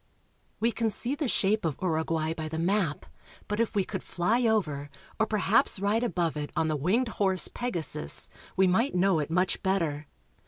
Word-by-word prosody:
We 230 +1 +2
can 230 -1 -1
see 240 +5 -1
the 290 -1 -2
shape 215 -1 +1
of 160 -4 -2
Uruguay 160 -2 -1
by 155 -1 -5
the 160 - -4
map, 170 -2 0 0.4
but 210 +1 -2
if 230 -1 0
we 200 - +2
could - - -5
fly 225 +8 0
over 150 -10 0 0.3
or 220 - +2
perhaps 210 -1 +2
ride 205 +4 +1
above 175 -9 -1
it 150 -1 -4
on 160 - +1
the 155 - 0
winged 200 - +1
horse, 190 -6 +2
Pegasus, 170 -10 +1 0.3
we 190 - +5
might 190 +8 +1
know 180 -2 +3
it 150 0 -3
much 180 +2 0
better. 165 -6 -1
190 Hz, 185 wpm, -28 LUFS, 160-220 Hz, 0.4 s, we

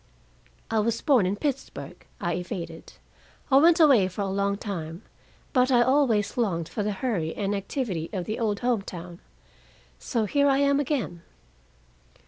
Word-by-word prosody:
"I 225 - +2
was 230 +2 0
born 255 -11 +3
in 195 - 0
Pittsburgh," 270 +4 -5 0.2
I 175 - -1
evaded. 170 -2 -6 0.6
"I 265 - +7
went 330 +4 +6
away 270 - +6
for 185 +2 -5
a 195 - -2
long 200 +1 0
time, 175 -3 -6 0.5
but 255 -2 +3
I 240 -1 +5
always 255 -6 +2
longed 175 -9 0
for 215 - -4
the 210 +1 -1
hurry 195 -7 -2
and 200 0 -1
activity 195 - -3
of 185 -4 -3
the 215 - -4
old 210 -3 -1
home 240 -4 +1
town. 175 -2 -9 0.8
So 230 -5 -1
here 285 +6 +2
I 270 -1 +4
am 280 0 +3
again." 255 - -2
210 Hz, 160 wpm, -26 LUFS, 185-260 Hz, 0.8 s, I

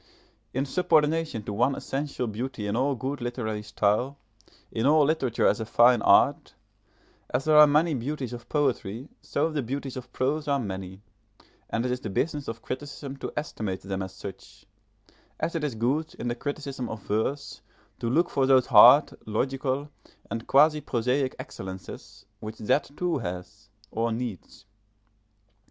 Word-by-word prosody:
In 135 +2 -1
subordination 155 -5 +1
to 105 - -5
one 125 +6 +2
essential 140 -2 -3
beauty 115 0 -4
in 105 +1 -1
all 135 +3 +1
good 130 +3 -4
literary 120 -3 -3
style, 105 +6 0 0.5
in 115 +3 0
all 150 0 +5
literature 135 -6 +1
as - - +3
a 110 - -3
fine 120 +1 +5
art, - - +4 0.7
as 135 - 0
there 155 -1 +4
are 150 0 +10
many 155 +3 +3
beauties 130 0 -3
of 120 0 -9
poetry 130 -4 -1
so 165 - -1
the 150 -2 -1
beauties 135 +2 -4
of 130 -1 -8
prose 145 +4 -1
are 140 -1 +2
many, 95 -4 -6 0.7
and 115 +2 -1
it 125 - 0
is 125 - -1
the 110 - -5
business 145 +7 -1
of 115 0 -6
criticism 140 +1 -6
to - - -5
estimate 110 -10 -3
them 95 0 -4
as 95 -1 -5
such; 95 0 -10 0.7
as 165 - -1
it 165 -3 -2
is 145 -6 -2
good 135 +8 -1
in 120 - -4
the - - 0
criticism 140 -2 -4
of 110 -3 -7
verse 110 +7 -2 0.4
to 115 - -2
look 170 +8 +3
for 135 -2 +2
those 130 -2 +5
hard, 125 +5 +8 0.2
logical, 135 +5 -1 0.4
and 115 0 -4
quasi 150 +2 +5
prosaic 130 +2 0
excellences 95 -4 -9
which 110 +1 -7
that 125 +8 +1
too 175 -5 0
has, 90 +1 -7 0.2
or 115 +1 0
needs. 110 -5 -6
130 Hz, 160 wpm, -27 LUFS, 110-145 Hz, 0.7 s, are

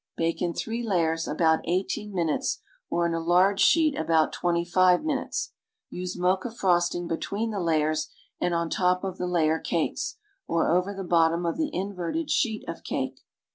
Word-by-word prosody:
Bake 165 0 -1
in 175 -1 -1
three 230 +1 -3
layers 165 -7 0
about 160 +1 +2
eighteen 190 +4 -1
minutes 170 -5 -1 0.3
or 170 - +1
in 170 - 0
a 165 - 0
large 180 +4 +3
sheet 315 +3 +4
about 160 0 +2
twenty 170 -1 0
five 180 0 +4
minutes. 290 -4 -2 0.4
Use 180 0 -5
mocha 185 +5 +1
frosting 175 -4 +1
between 205 +7 -2
the 205 - -3
layers 155 -2 +1 0.3
and 175 - 0
on 170 0 0
top 180 0 +1
of 190 -2 -4
the 180 - -1
layer 160 -2 +2
cakes, - - -2 0.3
or 165 -1 +1
over 180 +3 +2
the 195 -1 -5
bottom 170 -1 +2
of 170 - 0
the 315 -2 0
inverted 200 - -3
sheet 220 -4 0
of 165 - -6
cake. 130 0 -3
175 Hz, 175 wpm, -26 LUFS, 165-195 Hz, 0.4 s, sheet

